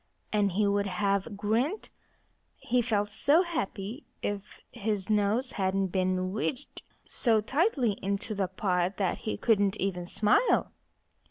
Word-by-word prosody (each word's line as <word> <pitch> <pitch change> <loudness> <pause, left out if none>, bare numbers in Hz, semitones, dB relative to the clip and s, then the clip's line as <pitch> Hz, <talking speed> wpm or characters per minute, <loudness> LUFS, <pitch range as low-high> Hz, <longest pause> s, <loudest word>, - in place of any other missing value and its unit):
And 205 -3 +2
he 210 +3 +2
would 200 0 +1
have 200 +2 -1
grinned 235 - 0 0.7
he 250 +1 +1
felt 210 -3 0
so 290 - +4
happy 235 - -4 0.2
if 205 0 -4
his 210 -3 -2
nose 215 +5 +1
hadn't 190 0 0
been 185 0 0
wedged 255 +6 -3 0.2
so 225 -3 +2
tightly 265 - +1
into 200 +2 -2
the 195 -2 0
pot 185 -1 -1
that 190 -3 0
he 215 - -3
couldn't 205 -3 +2
even 180 -2 -2
smile. 210 - +3
205 Hz, 135 wpm, -29 LUFS, 195-230 Hz, 0.7 s, so